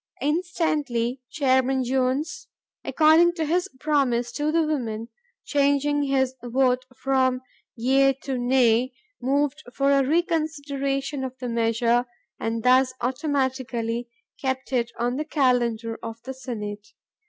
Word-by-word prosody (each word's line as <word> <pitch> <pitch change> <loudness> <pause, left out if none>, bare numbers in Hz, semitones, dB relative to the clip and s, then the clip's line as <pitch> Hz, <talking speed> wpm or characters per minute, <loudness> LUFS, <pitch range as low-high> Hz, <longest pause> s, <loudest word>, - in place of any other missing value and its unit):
Instantly 295 -6 -1
Chairman 260 -2 +2
Jones, 265 - -1 0.4
according 320 +2 +5
to 325 -2 -2
his 355 +5 0
promise 260 -6 +1
to 295 +4 -1
the 330 0 +3
women, 235 -7 -3 0.4
changing 285 0 +2
his 265 -2 +1
vote 250 +1 +1
from 260 -1 +1 0.3
"yea" 270 +3 +3
to 270 0 -5
"nay," 245 0 +3 0.3
moved 285 +3 0
for 275 +2 +1
a 275 -1 +4
reconsideration 285 -3 -1
of 260 0 -5
the 255 - -5
measure, 235 +1 +1 0.3
and 225 0 -2
thus 255 0 +4
automatically 255 -3 -2 0.3
kept 265 0 -3
it 235 -2 +1
on 245 +2 -1
the 305 - -1
calendar 240 -6 +1
of 225 0 -7
the 265 +2 -6
Senate. 210 -5 -6
260 Hz, 120 wpm, -24 LUFS, 245-290 Hz, 0.4 s, according